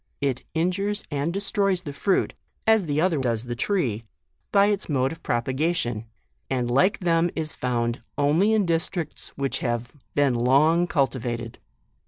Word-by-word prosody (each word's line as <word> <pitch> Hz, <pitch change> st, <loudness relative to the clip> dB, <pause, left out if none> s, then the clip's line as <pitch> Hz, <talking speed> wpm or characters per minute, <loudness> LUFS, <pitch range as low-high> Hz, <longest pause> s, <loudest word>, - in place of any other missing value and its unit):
It 135 Hz, -3 st, -1 dB
injures 195 Hz, +5 st, 0 dB
and 145 Hz, +3 st, -1 dB
destroys 195 Hz, -1 st, 0 dB
the 145 Hz, -4 st, -6 dB
fruit, 190 Hz, +6 st, +1 dB, 0.3 s
as 220 Hz, -5 st, +4 dB
the 145 Hz, 0 st, 0 dB
other 165 Hz, -3 st, +2 dB
does 120 Hz, -4 st, 0 dB
the 120 Hz, -1 st, -4 dB
tree, 120 Hz, -, 0 dB, 0.5 s
by 200 Hz, -1 st, +5 dB
its 205 Hz, -3 st, 0 dB
mode 135 Hz, -2 st, +1 dB
of 165 Hz, -, -9 dB
propagation; 120 Hz, -2 st, -1 dB, 0.4 s
and 125 Hz, -2 st, 0 dB
like 185 Hz, +12 st, +3 dB
them 170 Hz, -1 st, +2 dB
is 155 Hz, -1 st, -3 dB
found 120 Hz, -1 st, -1 dB, 0.2 s
only 155 Hz, +9 st, +3 dB
in 215 Hz, -3 st, +3 dB
districts 165 Hz, -1 st, -2 dB
which 140 Hz, -1 st, -1 dB
have 120 Hz, -1 st, -2 dB, 0.2 s
been 145 Hz, -3 st, +3 dB
long 145 Hz, +8 st, +4 dB
cultivated. 120 Hz, -6 st, -1 dB
145 Hz, 150 wpm, -25 LUFS, 125-180 Hz, 0.5 s, by